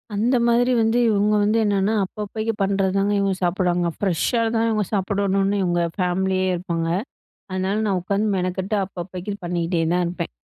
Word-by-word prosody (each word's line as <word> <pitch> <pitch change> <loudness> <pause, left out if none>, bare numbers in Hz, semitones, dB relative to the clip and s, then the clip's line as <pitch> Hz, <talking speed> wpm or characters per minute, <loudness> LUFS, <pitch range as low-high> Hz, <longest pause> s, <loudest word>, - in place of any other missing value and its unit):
அந்த 235 +5 +2
மாதிரி 245 +2 +3
வந்து 225 +2 +2
இவங்க 210 -1 +2
வந்து 210 +2 +2
என்னன்னா 205 0 +1
அப்பப்பைக்கு 215 +3 -4
பண்றது 195 -1 +1
தாங்க 200 +1 +1
இவங்க 195 -1 +1
சாப்டுவாங்க. 175 -1 +1
ஃப்ரெஷ்ஷா 200 +5 0
தான் 225 0 +2
இவங்க 215 -2 +1
சாப்படணுன்னு 195 0 +1
இவங்க 175 -1 +1
ஃபேமிலியே 185 0 0
இருப்பாங்க. 170 -2 -2 0.6
அதனால 185 +2 -1
நான் 190 -3 +1
உட்காந்து 200 +4 0
மெனக்கெட்டு 185 +3 -2
அப்பப்பைக்கு 185 +2 -6
பண்ணிட்டே 170 0 -1
தான் 180 0 +2
இருப்பேன். 170 -1 -4
195 Hz, 150 wpm, -22 LUFS, 180-210 Hz, 0.6 s, மாதிரி